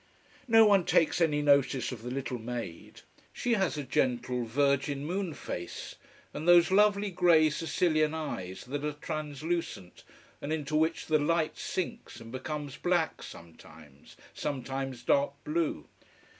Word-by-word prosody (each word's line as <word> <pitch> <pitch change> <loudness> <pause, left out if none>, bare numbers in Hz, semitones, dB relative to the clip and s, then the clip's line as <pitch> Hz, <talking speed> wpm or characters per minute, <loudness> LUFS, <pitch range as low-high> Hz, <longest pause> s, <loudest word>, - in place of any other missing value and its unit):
No 225 -1 +7
one 200 -3 +5
takes 165 +1 +2
any 150 -3 +2
notice 140 -3 +3
of 120 -4 -7
the 120 - -6
little 130 -1 -4
maid. 115 -7 -7 0.3
She 245 - -1
has 190 -7 0
a 145 - -3
gentle, 125 -1 0
virgin 140 +3 0
moon 180 -1 -3
face, 85 -8 -6 0.4
and 155 - -5
those 175 +1 +6
lovely 205 0 +3
grey 170 -4 +4
Sicilian 155 -1 +1
eyes 95 - -5
that 140 +3 -4
are 150 0 -1
translucent, 155 - -4 0.4
and 145 - -4
into 155 -1 -2
which 160 +2 +1
the 155 -1 +2
light 160 +1 +1
sinks 190 - -5
and 115 0 -11
becomes 145 +2 -5
black 175 -2 0
sometimes, 80 -3 -14 0.2
sometimes 135 -3 -4
dark 140 +2 +2
blue. 160 +1 -2
150 Hz, 140 wpm, -30 LUFS, 130-170 Hz, 0.4 s, No